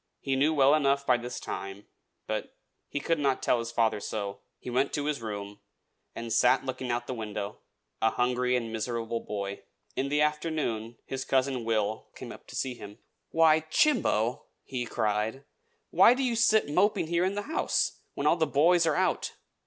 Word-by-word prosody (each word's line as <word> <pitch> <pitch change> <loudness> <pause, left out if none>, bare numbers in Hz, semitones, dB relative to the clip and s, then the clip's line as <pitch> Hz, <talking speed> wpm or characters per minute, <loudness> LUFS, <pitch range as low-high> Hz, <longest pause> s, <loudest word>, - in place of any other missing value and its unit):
He 135 -1 -1
knew 145 +4 +3
well 140 -2 +5
enough 140 -2 +2
by 125 -2 +4
this 120 +1 -6
time; 100 +1 -6 0.4
but - - -4 0.3
he 145 - -2
could 165 +2 0
not 135 -2 +1
tell 120 - +3
his 115 0 -4
father 115 -2 +1
so. 100 -1 -4 0.2
He - - -14
went 130 +3 +1
to 145 - -1
his 150 -4 -1
room, 105 -2 -6 0.6
and 115 -1 -4
sat 115 - +4
looking 130 -1 -4
out 120 0 0
of - - -24
the 130 - -4
window, 105 -3 -5 0.4
a 110 - +4
hungry 125 +1 +1
and 115 -2 -2
miserable 115 0 -2
boy. 100 -2 -5 0.3
In 135 +1 -1
the 150 +1 +1
afternoon 150 -7 -1
his 135 0 -4
cousin 130 -3 0
Will 110 -1 -1
came - - -8
up - - -12
to - - -10
see 130 -2 -1
him. 105 -3 -11 0.3
"Why, 160 -1 +5
Chimbo!" 155 - +1 0.2
he 125 -2 -4
cried. 110 +3 -1 0.5
"Why 245 - +7
do 270 - -1
you 245 -2 +1
sit 220 -2 +4
moping 185 +6 +2
here 170 +2 +1
in 190 +2 0
the 205 - -2
house, 315 - 0 0.2
when 140 - -3
all 160 +3 +4
the 160 -2 +2
boys 165 +4 +4
are 155 - +2
out? - - 0
130 Hz, 190 wpm, -28 LUFS, 115-150 Hz, 0.6 s, Why